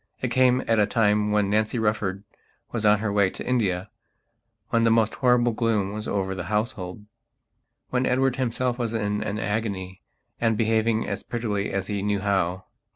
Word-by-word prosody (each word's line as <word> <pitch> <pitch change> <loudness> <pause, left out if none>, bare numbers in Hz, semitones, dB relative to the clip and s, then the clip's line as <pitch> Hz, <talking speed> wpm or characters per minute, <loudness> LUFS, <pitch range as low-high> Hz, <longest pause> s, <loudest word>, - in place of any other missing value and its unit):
It 125 - -2
came 130 +1 +3
at 115 -1 +3
a 105 - +4
time 105 -2 +2
when 105 -1 +2
Nancy 110 +3 +1
Rufford 105 -3 -1 0.5
was 110 -3 0
on 105 0 +6
her 105 0 -2
way 100 -2 +3
to - - -8
India; 105 -6 0 0.8
when 115 0 +2
the 115 - +4
most 110 -1 +3
horrible 125 -2 +3
gloom 110 -4 0
was 105 0 -5
over 95 -1 -1
the 90 -2 -5
household; 105 -1 -3 0.9
when 130 0 +1
Edward 130 0 +1
himself 125 0 -1
was 115 -1 -1
in 105 -1 -1
an 105 - -3
agony 100 -3 -3 0.4
and 115 -2 +1
behaving 110 0 +1
as - - -3
prettily 105 -4 -2
as 100 -1 -2
he 100 -1 -3
knew 100 0 0
how. 95 -2 0
105 Hz, 175 wpm, -25 LUFS, 100-115 Hz, 0.9 s, on